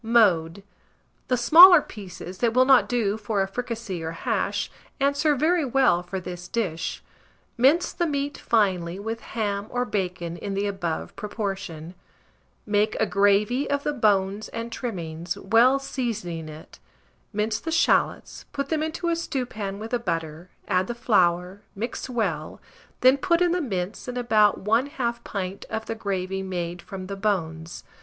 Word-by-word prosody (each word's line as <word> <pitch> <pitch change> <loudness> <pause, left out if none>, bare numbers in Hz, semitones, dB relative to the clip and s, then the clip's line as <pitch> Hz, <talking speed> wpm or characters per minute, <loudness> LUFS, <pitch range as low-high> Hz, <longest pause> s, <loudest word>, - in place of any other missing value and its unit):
Mode. 200 -6 +3 0.6
The 250 - +1
smaller 335 +9 +9
pieces, 190 -6 -9
that 235 -1 +1
will 255 0 +6
not 265 -1 +5
do 220 -4 0
for 210 -2 -1
a - - -3
fricassée 225 -4 -4
or 160 0 -4
hash, - - -1 0.3
answer 285 +2 +2
very 320 +4 +2
well 255 -9 +3
for 180 +2 -5
this 180 0 -7
dish. 180 -9 -3 0.5
Mince 275 +8 +3
the 345 - 0
meat 285 -1 -2
finely 185 -6 +1
with 225 +3 -4
ham 205 -2 -3
or 245 0 -1
bacon 180 -5 -3
in 195 +2 -4
the 200 +1 0
above 195 -5 -3
proportion; 195 -6 -5 0.7
make 210 +1 +1
a 220 - +3
gravy 205 +7 +2
of 285 0 0
the 295 - -1
bones 205 -4 +1
and 230 0 -5
trimmings, 175 -6 -4
well 230 +7 +4
seasoning 220 - -4
it; 155 +1 -12 0.5
mince 215 +1 -1
the 325 - -5
shalots, 330 +1 +1
put 280 -1 -3
them 315 -1 0
into 320 +2 -3
a 335 - +2
stewpan 240 -11 -4
with 220 +2 -7
the 245 - +1
butter, 165 -4 -4 0.2
add 185 +1 +1
the 240 - -4
flour; 180 -4 +1
mix 235 +5 -4
well, 240 -3 -2 0.4
then 255 +2 +6
put 335 +4 +2
in 355 -1 +3
the 355 0 +1
mince, 195 - -4
and 250 0 -4
about 215 -5 +3
1/2 235 +2 0
pint 195 -2 -5
of 220 0 -3
the - - -3
gravy 190 -3 -3
made 175 -2 -4
from 190 -1 -8
the 200 +1 -5
bones. 170 -5 -2
210 Hz, 160 wpm, -25 LUFS, 185-250 Hz, 0.7 s, smaller